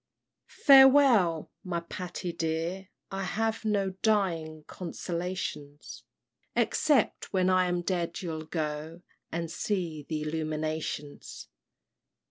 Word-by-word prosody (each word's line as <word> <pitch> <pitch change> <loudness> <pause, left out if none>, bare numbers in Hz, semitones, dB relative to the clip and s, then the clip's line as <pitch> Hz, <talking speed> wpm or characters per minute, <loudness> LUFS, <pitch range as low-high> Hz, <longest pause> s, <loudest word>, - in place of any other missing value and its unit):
"Farewell, 265 - +6
my 175 -2 -2
Patty 175 0 -5
dear, 165 +3 -2 0.2
I 195 0 -3
have 220 +5 -1
No 200 -3 +1
dying 165 -8 0
consolations, 170 -4 -5 0.5
Except, 285 -8 +1
when 185 -1 +2
I 185 0 +3
am 175 0 -1
dead, 175 -2 -2
you'll 160 -2 -4
go 155 +1 -4 0.3
And 165 -1 -3
see 170 -5 -2
th' 155 - -8
Illuminations." 155 -1 -4
175 Hz, 100 wpm, -29 LUFS, 160-195 Hz, 0.5 s, Farewell